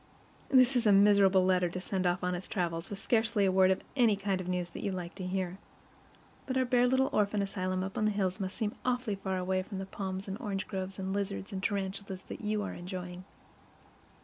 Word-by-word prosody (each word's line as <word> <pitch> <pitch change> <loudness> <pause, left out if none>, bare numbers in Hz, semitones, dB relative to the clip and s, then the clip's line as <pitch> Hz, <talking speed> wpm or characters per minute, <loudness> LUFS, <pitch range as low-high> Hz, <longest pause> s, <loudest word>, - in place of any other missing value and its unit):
This 260 -1 +5
is 240 -2 +3
a - - +7
miserable 195 -2 +6
letter 180 -1 +3
to 180 - -5
send 185 0 -1
off 175 +1 0
on 180 0 0
its 180 +1 -5
travels, 170 -3 -2
with 200 - -5
scarcely 220 -1 +2
a 190 - +3
word 185 0 +5
of 190 - +1
the 235 -6 +4
kind 195 -1 -1
of 180 - -7
news 180 -1 -2
that - - -7
you 200 - -1
like 180 -2 -5
to 185 -2 -5
hear. 185 0 -2 0.9
But 260 -1 -1
our 260 - +3
bare 245 0 +3
little 260 +1 +2
orphan 205 -1 +2
asylum 185 -1 -2
up 190 +1 -5
in 215 - +1
the - - +4
hills 195 -1 -1
must 190 -1 -4
seem 215 -3 -1
awfully 250 -3 0
far 195 -1 -2
away 185 +1 0
from 195 +1 -7
the 190 - -4
palms 190 0 -5
and 195 +3 -4
orange 200 -4 -3
groves 190 0 -4
and 190 0 -3
lizards 200 0 -3
and 190 - -3
tarantulas 195 -1 -3
that - - -6
you 210 -1 -1
are - - -4
enjoying. 180 0 -7
195 Hz, 230 wpm, -31 LUFS, 185-210 Hz, 0.9 s, a